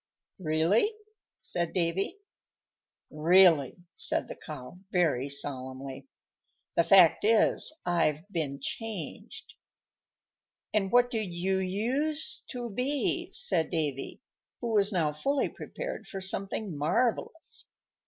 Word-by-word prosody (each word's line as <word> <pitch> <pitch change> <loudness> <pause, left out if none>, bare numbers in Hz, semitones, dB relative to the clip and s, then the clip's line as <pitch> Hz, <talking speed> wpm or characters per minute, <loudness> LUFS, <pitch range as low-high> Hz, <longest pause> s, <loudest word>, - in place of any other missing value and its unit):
"Really?" 170 - +2 0.5
said 170 -2 -2
Davy. 185 - -1 0.9
"Really," 165 -3 +5 0.2
said - - +2
the - - -7
Cow, 150 +2 -9
very 145 -7 +1
solemnly. 135 - -3 0.7
"The 170 - +4
fact 175 -1 +6
is, 220 +6 +4
I've 165 -1 +1
been 145 -6 -2
changed." 210 - -5 1.2
"And 195 -3 +1
what 245 0 +4
did 215 -6 -2
you 190 +2 0
use 255 +12 -1
to 245 -3 -5
be?" 285 - 0
said 185 - +2
Davy, 150 - -3 0.4
who 240 - -3
was 205 0 +3
now 165 -6 +1
fully 275 - 0
prepared - - -7
for 195 - -6
something 190 0 -2
marvellous. 245 - -1
185 Hz, 105 wpm, -29 LUFS, 155-230 Hz, 1.2 s, fact